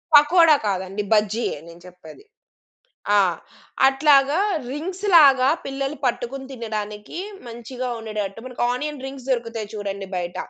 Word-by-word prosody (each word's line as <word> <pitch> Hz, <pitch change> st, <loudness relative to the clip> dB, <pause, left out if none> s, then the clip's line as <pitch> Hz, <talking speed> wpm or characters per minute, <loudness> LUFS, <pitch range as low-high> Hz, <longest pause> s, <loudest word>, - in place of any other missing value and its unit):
పకోడా 310 Hz, +1 st, +7 dB
కాదండి 195 Hz, +1 st, -2 dB
బజ్జీ‌యే 215 Hz, -3 st, +1 dB
నేను 170 Hz, +1 st, -13 dB
చెప్పేది. 180 Hz, -, -14 dB, 0.9 s
ఆ! -, -, +6 dB, 0.7 s
అట్లాగా 275 Hz, +2 st, +4 dB, 0.3 s
రింగ్స్ 360 Hz, +7 st, -5 dB
లాగా 270 Hz, -4 st, +6 dB, 0.2 s
పిల్లలు 275 Hz, +2 st, -3 dB
పట్టుకొని 255 Hz, +2 st, -2 dB
తినడానికి 215 Hz, 0 st, -6 dB, 0.3 s
మంచిగా 240 Hz, +2 st, -6 dB
ఉండేటట్టు 215 Hz, -2 st, -5 dB
మనకి 250 Hz, -2 st, -5 dB
ఆనియన్ 290 Hz, +2 st, -4 dB
రింగ్స్ 270 Hz, -1 st, -9 dB
దొరుకుతాయి 230 Hz, -4 st, -2 dB
చూడండి 200 Hz, -1 st, -5 dB
బయట. 175 Hz, -1 st, -4 dB
240 Hz, 115 wpm, -22 LUFS, 210-275 Hz, 0.9 s, పకోడా